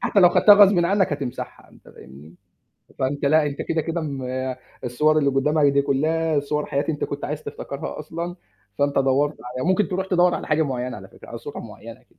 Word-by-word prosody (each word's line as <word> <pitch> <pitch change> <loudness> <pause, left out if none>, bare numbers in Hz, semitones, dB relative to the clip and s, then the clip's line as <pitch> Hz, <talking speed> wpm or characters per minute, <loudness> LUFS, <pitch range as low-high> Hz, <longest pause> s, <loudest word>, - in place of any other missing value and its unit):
حتى 200 - +2
لو 180 - +8
خَدتها، 205 +3 +7
غصبٍ 200 -2 +6
عنك 195 -1 +1
هتمسحها، 140 -4 -6
أنت - - -19
فاهمني؟ 70 +6 -14 0.6
فأنت 140 +2 -2
لأ، 155 +2 +4
أنت 140 -1 -4
كده، 165 - -1
كده 165 +2 -3
م 140 -4 -5 0.6
الصور 150 +6 +2
اللي 140 -2 +2
قدّامك 145 +3 +2
دي 140 - +3
كلّها، 155 +3 0
صور 150 +1 -2
حياة 140 +1 -1
أنت 150 -2 -1
كنت 140 - -5
عايز 150 +1 -4
تفتكرها 140 - -6
أصلًا، 170 +4 -6 0.4
فأنت 140 0 +1
دوَّرت 135 +3 +1
عليها 130 +6 -4
ممكن 190 +2 +2
تروح 190 0 -2
تدوَّر 180 -1 +3
على - - -5
حاجة 155 +1 +2
معيّنة 125 -4 -3
على 95 -2 -11
فكرة، - - -16
على - - -7
صورة - - -8
معيّنة. - - -11
150 Hz, 195 wpm, -23 LUFS, 140-165 Hz, 0.6 s, لو